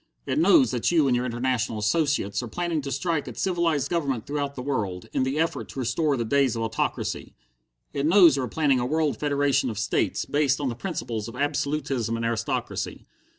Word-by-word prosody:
It - - 0
knows 315 -4 +5
that - - 0
you 165 -4 +3
and 125 - +3
your 125 +1 0
international 120 -2 -1
associates 105 -3 0
are 120 - -5
planning 170 +4 -2
to 140 0 -5
strike 145 +2 -1
at - - -8
civilized 170 -6 0
government 140 -9 -1
throughout 140 0 -3
the 125 - -5
world, 105 -10 -2
in - - +1
the 130 +3 0
effort 165 +1 -1
to - - -7
restore 135 +4 0
the 115 - -1
days 135 0 +2
of 115 - -2
autocracy. 110 0 -3 0.6
It 140 +1 0
knows 170 -4 +7
you 135 - -1
are 125 - -2
planning 140 0 +2
a 120 - -1
world 155 0 0
federation 145 -3 +1
of 110 - -5
states, 105 - 0
based 145 -2 +1
on 140 -3 -1
the 120 - -4
principles 115 - -4
of 115 - -9
absolutism 140 -4 -1
and 115 - -2
aristocracy. 115 -1 -3
140 Hz, 200 wpm, -25 LUFS, 120-150 Hz, 0.6 s, knows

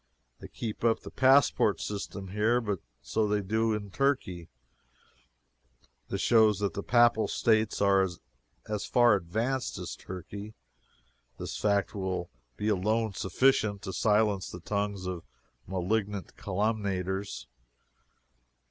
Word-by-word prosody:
They - - -9
keep 110 -2 -6
up 115 -1 +3
the - - -9
passport 135 0 +4
system 100 -1 -5
here, 110 +5 +2
but 105 -6 -2 0.2
so 110 -1 0
they 105 0 +1
do 110 +3 0
in 105 -2 -3
Turkey. 95 - -1 1.6
This - - -3
shows 110 -3 +5
that 100 0 -1
the 100 - -3
Papal 120 -1 +4
States 110 -2 +1
are 95 -1 +4 0.6
as 105 -1 -2
far 120 -2 +5
advanced 110 +8 -1
as - - -5
Turkey. 100 +4 -8 0.8
This - - -5
fact 100 -2 +1
will 95 -3 -3 0.3
be 105 - -2
alone 110 +2 +1
sufficient 100 +1 +1
to 95 -2 -5
silence 105 -2 +2
the 90 - -8
tongues 100 0 -2
of 90 -2 -4 0.5
malignant 95 +1 -2
calumniators. 100 -1 -2
105 Hz, 120 wpm, -29 LUFS, 95-110 Hz, 1.6 s, shows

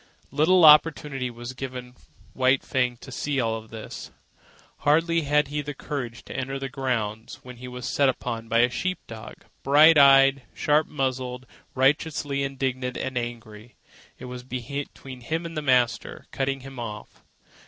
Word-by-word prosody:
Little 160 +5 +4
opportunity 150 -4 +5
was 120 +1 -8
given 125 -1 -7 0.4
White 130 +1 +2
Fang 125 -2 0
to 130 - -11
see 140 +2 -2
all 115 -2 -1
this. 110 -1 -9 0.7
Hardly 165 +3 +2
had 150 0 +2
the 145 0 -4
carriage 125 -5 -5
entered 135 +1 -4
the 135 - -3
grounds, 115 -5 -3
when 125 -1 -11
he 125 +1 -9
was 125 0 -6
set 140 0 +2
upon 115 -3 -4
by 115 +1 +3
a 120 - +4
sheep 185 +9 -2
dog, 110 -1 -11 0.2
bright 150 +3 +6
eyed, 135 -1 +6
sharp 150 +1 +2
muzzled, 130 -2 -3 0.3
righteously 140 +1 +1
indignant 130 -2 -2
and 130 -1 -4
angry. 120 -2 -6 0.4
It - - -10
was 125 0 -7
between 130 +1 -7
him 160 +7 -3
and 165 0 -7
the 155 - -2
master, 125 -4 +1
cutting 135 0 -2
him 135 -1 -10
off. 110 -3 -8
130 Hz, 150 wpm, -25 LUFS, 125-145 Hz, 0.7 s, bright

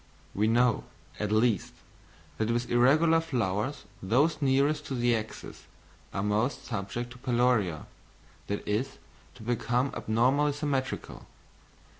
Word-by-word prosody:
We 105 +2 +1
know, 120 0 +2 0.3
at 105 -1 -2
least, 110 -2 +2 0.7
that 110 0 0
with 120 +1 -1
irregular 155 +7 +4
flowers 125 - -2 0.2
those 140 - +2
nearest 140 +2 +2
to 135 - -3
the 120 -1 +2
axis 110 0 -7 0.5
are 95 - -2
most 105 +6 0
subject 120 +5 -4
to 125 - -12
peloria, 120 - +1 0.6
that 100 - -4
is 125 +6 -1 0.4
to 120 - -12
become 120 +3 0
abnormally 130 +7 +2
symmetrical. 140 -3 -3
120 Hz, 120 wpm, -29 LUFS, 110-135 Hz, 0.7 s, irregular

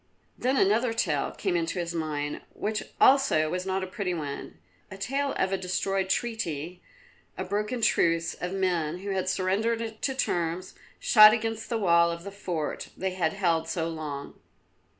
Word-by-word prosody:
Then 260 +2 0
another 225 +4 +3
tale 160 -11 0
came 190 -4 -2
into 170 +2 -1
his 170 -1 -2
mind 150 -3 -3
which 215 0 -2 0.2
also 260 - +5
was 180 +1 -3
not 190 0 0
a - - -1
pretty 185 -1 -3
one, 145 - -6 0.3
a 190 - -9
tale 275 +7 -1
of 190 0 0
a 190 - 0
destroyed 190 +1 -1
treaty, 180 -7 -2 0.6
and - - -3
a - - -12
broken 210 +4 -2
truce; 165 -4 +2
of 180 - -5
men, 175 -4 0
who 200 0 -4
had 190 -1 -1
surrendered 220 +4 -1
to 265 - -1
terms, 175 -6 -1 0.3
shot 215 -1 +8
against 225 -1 -2
the 235 - 0
wall 170 -4 +4
of 170 0 -5
the 200 - -7
fort 175 -6 -4
they 190 0 -1
had 170 -4 0
held 170 -5 +1
so 165 -1 -1
long. 150 -3 -6
185 Hz, 170 wpm, -27 LUFS, 165-215 Hz, 0.6 s, shot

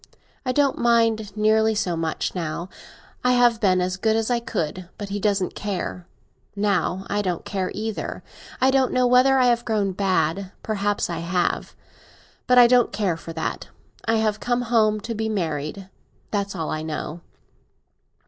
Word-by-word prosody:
I - - +3
don't 280 +1 +2
mind 225 -3 +2
nearly 220 +1 +3
so 180 -4 0
much 165 -1 -2
now. 170 0 -4 0.5
I 250 0 +4
have 240 -2 +4
been 185 -3 +3
as 180 +1 -1
good 220 +3 +1
as 225 +2 0
I 240 - +2
could, 180 -5 -4
but 205 -1 -6
he 205 +1 -3
doesn't 200 -2 0
care. 185 -3 -4 0.5
Now 200 -2 0
I 205 +1 0
don't 180 -4 -3
care 190 -2 -2
either. 220 0 -4 0.4
I 260 +1 +4
don't 265 -1 +2
know 255 0 +3
whether 255 +2 +5
I 255 - +4
have 240 -1 +3
grown 210 -4 0
bad; 185 -1 0
perhaps 205 -1 -1
I 170 -2 -4
have. 175 +1 -1 0.7
But 250 - +4
I 245 - +10
don't 245 0 +4
care 200 -4 0
for 165 0 -9
that. 160 - -4 0.4
I 225 - +1
have 215 -1 +1
come 245 +1 0
home 215 -3 +2
to 230 - -4
be 220 0 -2
married—that's 190 +3 -4
all 160 - -3
I 155 - -2
know. 155 +1 -5
205 Hz, 165 wpm, -23 LUFS, 185-230 Hz, 0.7 s, I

